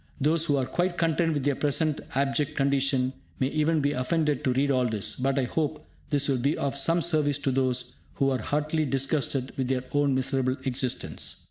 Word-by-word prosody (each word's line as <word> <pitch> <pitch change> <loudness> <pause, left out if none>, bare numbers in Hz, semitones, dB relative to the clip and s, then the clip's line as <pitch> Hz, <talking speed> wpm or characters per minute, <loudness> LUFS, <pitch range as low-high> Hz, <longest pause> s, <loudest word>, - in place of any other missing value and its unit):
Those 160 +3 +2
who 145 -3 +2
are 130 - +1
quite 175 +5 -1
content 165 -1 +1
with 145 - -1
their 145 +1 +2
present 150 +2 0
abject 140 +2 0
condition 135 -2 +1 0.3
may 130 - +1
even 155 +1 +1
be 145 0 +1
offended 150 +2 0
to 130 -4 +2
read 140 +2 +2
all 125 -2 +2
this; 105 -2 -1
but 135 +3 0
I 135 - +2
hope 155 +4 -2 0.2
this 145 -1 +1
will 135 -3 +1
be 140 +5 +1
of 140 -1 -1
some 165 +5 +2
service 150 -4 +2
to 140 -2 -1
those 125 -1 -1 0.2
who 135 0 +2
are 130 -3 -1
heartily 150 +4 0
disgusted 135 -1 -1
with 130 -2 -1
their 130 -1 0
own 145 -2 +2
miserable 130 0 0
existence. 125 - -1
140 Hz, 200 wpm, -27 LUFS, 130-150 Hz, 0.3 s, Those